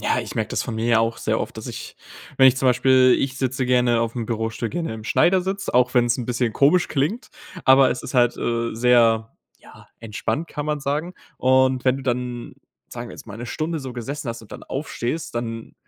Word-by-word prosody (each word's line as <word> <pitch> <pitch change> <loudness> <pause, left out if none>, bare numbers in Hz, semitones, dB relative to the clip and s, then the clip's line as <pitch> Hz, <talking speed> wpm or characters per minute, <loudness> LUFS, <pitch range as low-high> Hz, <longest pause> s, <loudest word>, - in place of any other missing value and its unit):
Ja, - - +1
ich - - -8
merke - - -1
das - - -1
von 115 - -5
mir 115 0 +2
auch 115 0 0
sehr - - -1
oft, - - -5
dass - - -7
ich, - - -8 0.4
wenn 130 - +7
ich 130 0 +5
zum 130 - 0
Beispiel, 130 0 +5
ich 135 0 -2
sitze 130 -1 -1
gerne 125 -2 +3
auf'm 115 0 -2
Bürostuhl, 115 0 -3
gerne 165 -8 -3
im 110 -1 -9
Schneidersitz, 190 - +1
auch 125 +1 +3
wenn's 120 -1 +3
'n 120 - -3
bisschen 120 -2 -1
komisch 150 +9 +3
klingt, 155 - -1 0.4
aber 130 0 +6
es 125 - -3
ist - - -8
halt, 120 -1 +3
äh, 115 0 -1
sehr, 115 -2 +3 0.2
ja, - - -17
entspannt, 115 +9 -3
kann 145 0 -5
man 150 -1 -1
sagen. 150 +6 -2 0.2
Und 130 0 +2
wenn 130 0 +3
du 135 - -7
dann, 125 -1 -3 0.4
sagen - - -7
wir - - -9
jetzt - - -12
mal 105 - -9
'ne 120 +1 -7
Stunde 160 +5 -3
so 130 -2 -7
gesessen 135 +3 -5
hast 115 -1 -5
und 105 - -15
dann - - -9
aufstehst, 135 0 -4
dann 115 -1 -5
125 Hz, 215 wpm, -22 LUFS, 115-135 Hz, 0.4 s, wenn